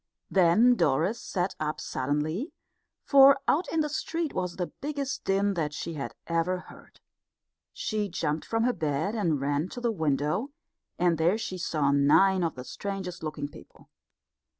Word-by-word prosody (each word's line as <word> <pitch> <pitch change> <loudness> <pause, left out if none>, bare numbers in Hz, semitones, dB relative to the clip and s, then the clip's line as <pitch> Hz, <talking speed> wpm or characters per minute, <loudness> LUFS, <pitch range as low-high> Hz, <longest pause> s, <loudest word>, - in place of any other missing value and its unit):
Then 195 +7 +5
Doris 175 - +1
sat 185 0 -2
up 155 0 -2
suddenly, 150 - -2 0.5
for 275 0 +7
out 330 +5 +1
in 325 - +2
the 300 - 0
street 320 +1 -2
was 180 -1 -2
the 180 - -2 0.2
biggest 280 -1 -3
din 200 +1 +2
that 150 -4 -2
she 165 - -4
had 140 -3 -5
ever 170 +2 0
heard. 180 - -15 0.7
She 210 -2 -2
jumped 150 -2 -2
from 225 0 -1
her 250 +1 +2
bed 155 +3 -1
and 170 -10 0
ran 145 +5 -1
to - - -7
the 240 -1 0
window, 160 - 0 0.5
and 170 -2 +2
there 175 +6 +3
she 185 -4 -5
saw 150 -4 +1
nine 175 +7 +4
of 165 - -1
the 125 - -7
strangest 195 -1 -5
looking 150 -2 -4
people. 145 - -16
180 Hz, 160 wpm, -28 LUFS, 155-220 Hz, 0.7 s, for